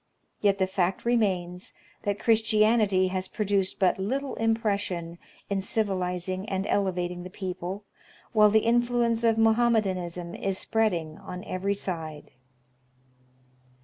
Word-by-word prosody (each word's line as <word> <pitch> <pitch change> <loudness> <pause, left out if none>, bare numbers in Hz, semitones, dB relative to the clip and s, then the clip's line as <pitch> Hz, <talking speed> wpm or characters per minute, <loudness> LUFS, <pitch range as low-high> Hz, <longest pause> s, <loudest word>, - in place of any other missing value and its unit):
Yet 200 -1 +3
the 190 - +2
fact 185 +1 -1
remains 185 -6 0 0.3
that 205 -1 0
Christianity 215 -4 +3
has 185 0 -2
produced 200 -2 0
but 190 -1 +2
little 265 +8 -2
impression 200 -7 -1 0.3
in 200 -1 -1
civilizing 185 -1 -2
and 195 0 -1
elevating 180 -3 -1
the 180 - -8
people, 185 0 -5 0.5
while 215 -2 +6
the 220 +1 +3
influence 235 0 +2
of 225 -1 +3
Mohommedanism 200 -7 +1
is 195 -1 -2
spreading 175 -10 0
on 180 0 -7
every 195 +2 -1
side. 160 -6 -5
195 Hz, 115 wpm, -27 LUFS, 180-220 Hz, 0.5 s, while